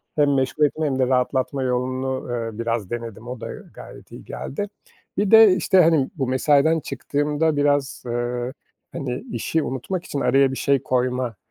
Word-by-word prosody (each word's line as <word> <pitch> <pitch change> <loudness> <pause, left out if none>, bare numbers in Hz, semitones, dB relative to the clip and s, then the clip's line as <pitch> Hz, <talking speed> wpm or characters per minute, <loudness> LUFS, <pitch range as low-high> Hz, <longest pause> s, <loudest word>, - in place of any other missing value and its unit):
hem 145 -2 +3
meşgul 135 +3 +2
etme 155 +2 -1
hem 135 -3 -1
de 130 - +3
rahatlatma 130 +1 0
yolunu, 130 +1 -2
eee, 115 -2 -4
biraz 115 -4 -2
denedim, 115 -1 -6
o 125 -1 -7
da - - -5
gayet - - -13
iyi - - -11
geldi. 205 +9 -5 0.5
Bir 205 -1 +1
de 220 -4 +8
işte, 185 +1 +4
hani, 160 -5 +3
bu 135 -5 -2
mesaiden 145 +5 +3
çıktığımda 145 +3 -1
biraz, 145 -1 +1
eee, 120 +1 -2 0.4
hani, 125 -2 -4
işi 150 +7 -1
unutmak 165 +8 -4
için 140 - -4
araya 135 0 +3
bir 130 - -5
şey 140 -2 +1
koyma 125 -2 -1
130 Hz, 165 wpm, -22 LUFS, 125-150 Hz, 0.5 s, de